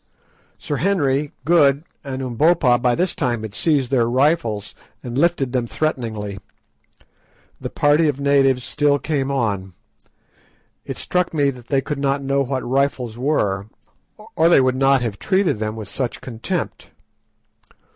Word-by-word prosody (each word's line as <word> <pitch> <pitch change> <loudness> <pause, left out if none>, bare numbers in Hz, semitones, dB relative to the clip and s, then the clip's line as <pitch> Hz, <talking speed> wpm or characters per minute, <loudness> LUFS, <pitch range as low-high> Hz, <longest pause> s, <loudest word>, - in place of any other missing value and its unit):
Sir 145 - -4
Henry, 145 -6 +1
Good, 145 -3 +4 0.2
and 135 -2 -5
Umbopa 130 0 +3
by 125 -1 +2
this 180 +5 0
time 120 -6 -1
had 110 -2 -6
seized 140 -2 +1
their 120 -3 +2
rifles 130 -6 +1 0.3
and 120 -1 -6
lifted 145 -3 +1
them 125 -2 0
threateningly. 110 -10 -3 1.2
The - - -5
party 150 +2 +3
of 145 -2 -1
natives 135 -2 +3
still 145 +3 +1
came 140 -2 -2
on. 105 -8 -1 1.1
It - - -6
struck 180 -2 -1
me 140 -2 +2
that 125 -2 -13
they 135 -2 +1
could 145 +1 -4
not 140 0 0
know 140 0 +1
what 135 -1 -2
rifles 130 -3 0
were, 105 -8 0 0.7
or 165 +1 +4
they 170 - +6
would 130 -1 +2
not 135 -1 +3
have 105 -4 -4
treated 190 - +1
them 110 0 -3
with 110 -3 -7
such 125 +3 -4
contempt. 130 +9 -5
135 Hz, 145 wpm, -21 LUFS, 120-145 Hz, 1.2 s, they